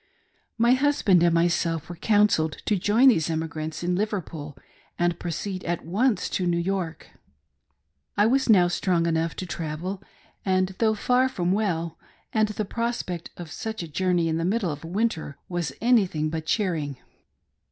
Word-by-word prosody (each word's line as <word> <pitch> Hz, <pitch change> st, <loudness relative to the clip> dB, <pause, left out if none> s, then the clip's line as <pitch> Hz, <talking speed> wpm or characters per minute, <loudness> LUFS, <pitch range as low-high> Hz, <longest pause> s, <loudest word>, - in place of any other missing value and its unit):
My 235 Hz, +1 st, +4 dB
husband 260 Hz, -9 st, +3 dB
and 170 Hz, 0 st, +4 dB
myself 165 Hz, -1 st, +1 dB
were 175 Hz, -, -7 dB
counselled 205 Hz, -5 st, +3 dB
to 210 Hz, -, +2 dB
join 215 Hz, +8 st, +5 dB
these 165 Hz, -, +2 dB
emigrants 160 Hz, 0 st, -3 dB
in 175 Hz, +1 st, 0 dB
Liverpool 170 Hz, -8 st, -3 dB, 0.4 s
and 175 Hz, -1 st, 0 dB
proceed 185 Hz, +2 st, -4 dB
at 170 Hz, -2 st, -2 dB
once 205 Hz, +4 st, +1 dB
to 180 Hz, -, 0 dB
New 170 Hz, -1 st, +1 dB
York. 170 Hz, -2 st, -3 dB, 1.1 s
I 205 Hz, -, +5 dB
was 260 Hz, +3 st, +2 dB
now 185 Hz, -5 st, +6 dB
strong 175 Hz, -1 st, +1 dB
enough 165 Hz, 0 st, 0 dB
to 185 Hz, -, -5 dB
travel, 170 Hz, +3 st, -4 dB, 0.4 s
and 185 Hz, -1 st, +2 dB
though 220 Hz, -1 st, +3 dB
far 250 Hz, +4 st, +2 dB
from 180 Hz, -7 st, -1 dB
well, 170 Hz, -5 st, -1 dB, 0.3 s
and 215 Hz, -1 st, +3 dB
the 210 Hz, 0 st, -3 dB
prospect 230 Hz, -6 st, -3 dB
of 170 Hz, -3 st, -8 dB
such 220 Hz, 0 st, -4 dB
a -, -, -6 dB
journey 175 Hz, +1 st, +1 dB
in 160 Hz, 0 st, 0 dB
the 165 Hz, -, -1 dB
middle 190 Hz, -1 st, 0 dB
of 145 Hz, +1 st, -7 dB
winter, 170 Hz, -5 st, -2 dB
was 175 Hz, -5 st, -2 dB
anything 190 Hz, -10 st, +2 dB
but 160 Hz, -1 st, -4 dB
cheering. 160 Hz, -, -1 dB
180 Hz, 160 wpm, -25 LUFS, 165-210 Hz, 1.1 s, now